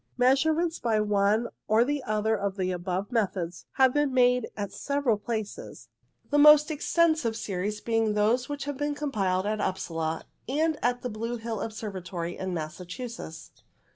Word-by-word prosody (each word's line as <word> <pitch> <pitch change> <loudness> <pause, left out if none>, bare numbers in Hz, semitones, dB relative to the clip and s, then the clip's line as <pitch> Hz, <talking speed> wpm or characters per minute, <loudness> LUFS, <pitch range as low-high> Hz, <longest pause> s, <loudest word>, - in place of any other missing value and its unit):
Measurements 315 +7 +2
by 225 -3 +1
one 210 +2 +2 0.2
or 220 +2 +4
the 290 +1 -1
other 215 +1 +1
of 200 -1 -2
the 185 -1 0
above 185 +3 -3
methods 185 -7 -2
have 260 -1 +4
been 290 -2 +2
made 250 -2 +3
at 200 -2 -3
several 280 +1 0
places, 220 - -6 0.4
the 290 - +4
most 300 0 +9
20 - - -1
INTRODUCTORY - - -3
extensive 315 -6 +2
series 210 0 -3
being 225 -2 +1
those 225 +6 +2
which 290 -1 -4
have 285 -2 -4
been 290 +1 -1
com 290 -1 -3
piled 190 -4 0
at 215 0 -1
Upsala, 165 -4 -2 0.2
and 310 +3 +1
at 245 0 0
the 250 - -2
Blue 230 +3 -3
Hill 225 -2 -4
Observatory 185 -6 -5
in 190 0 -4
Massachusetts. 175 +2 -6
220 Hz, 170 wpm, -27 LUFS, 195-265 Hz, 0.4 s, most